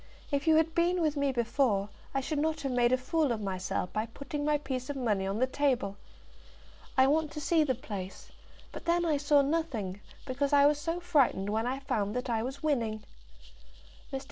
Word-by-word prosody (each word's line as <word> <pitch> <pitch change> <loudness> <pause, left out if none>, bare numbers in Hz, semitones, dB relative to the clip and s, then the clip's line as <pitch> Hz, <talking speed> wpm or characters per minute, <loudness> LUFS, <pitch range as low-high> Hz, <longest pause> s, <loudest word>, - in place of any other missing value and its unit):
If 280 +2 -1
you 320 - +6
had 320 +1 +3
been 350 +2 +2
with 310 -3 +1
me 280 -1 +1
before, 235 -4 +1 0.2
I 270 - 0
should 295 +2 -2
not 310 0 0
have 275 -2 -2
made 245 -1 +3
a 255 - +4
fool 295 +2 0
of 230 - -1
myself 185 -2 -3
by 215 +2 -1
putting 280 +5 -5
my 300 0 +2
piece 260 -3 -4
of 285 - -2
money 210 -7 0
on 195 +2 -2
the 255 - +3
table. 260 -7 0 1.0
I 260 - +7
want 305 +3 +2
to 300 - -5
see 315 +2 +3
the 265 -4 0
place; 200 -6 -7 0.4
but - - -9
then 345 +1 +2
I 310 -3 +2
saw 285 0 +4
nothing, 260 - -2 0.2
because 275 +2 -1
I 285 0 +7
was 295 0 +4
so 330 +3 -2
frightened 280 - +2
when 220 +2 0
I 260 +2 -1
found 210 -6 -2
that 250 0 -2
I 225 -1 +1
was 265 +5 -5
winning." 230 -8 0 1.1
Mr. 270 - -2
270 Hz, 205 wpm, -30 LUFS, 230-300 Hz, 1.1 s, I